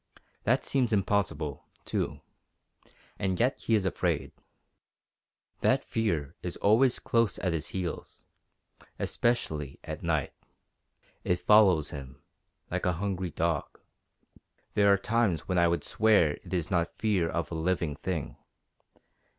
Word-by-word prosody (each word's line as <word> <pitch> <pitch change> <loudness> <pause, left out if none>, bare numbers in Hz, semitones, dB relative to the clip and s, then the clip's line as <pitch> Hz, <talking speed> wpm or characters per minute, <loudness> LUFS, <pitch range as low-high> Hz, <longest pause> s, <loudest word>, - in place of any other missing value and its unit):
That - - +2
seems 130 -4 +1
impossible, 100 -8 0 0.2
too. - - -2 1.0
And 95 -2 -1
yet 125 +4 +1
he 115 - +2
is 100 -3 +1
afraid. 95 - -1 1.3
That - - +2
fear 85 -11 -1
is - - -5
always 120 +5 +4
close 115 -2 +1
at 90 -3 -1
his 80 -2 -2
heels, 90 -3 -5 0.7
especially 75 - -1
at - - -6
night. - - -1 0.9
It 90 - +2
follows 95 -7 +5
him 65 -3 -9 0.5
like - - -1
a 90 - +2
hungry 95 0 -2
dog. 80 -2 -2 0.9
There 100 -1 +5
are 100 - +5
times 105 -4 +1
when 90 -2 +1
I 85 - +5
would 85 0 0
swear 105 -8 +3
it - - -12
is 90 0 -1
not 85 -2 0
fear 100 -7 +1
of 85 0 -3
a - - -3
living 80 -2 -1
thing. 85 -1 -4
90 Hz, 130 wpm, -29 LUFS, 80-105 Hz, 1.3 s, follows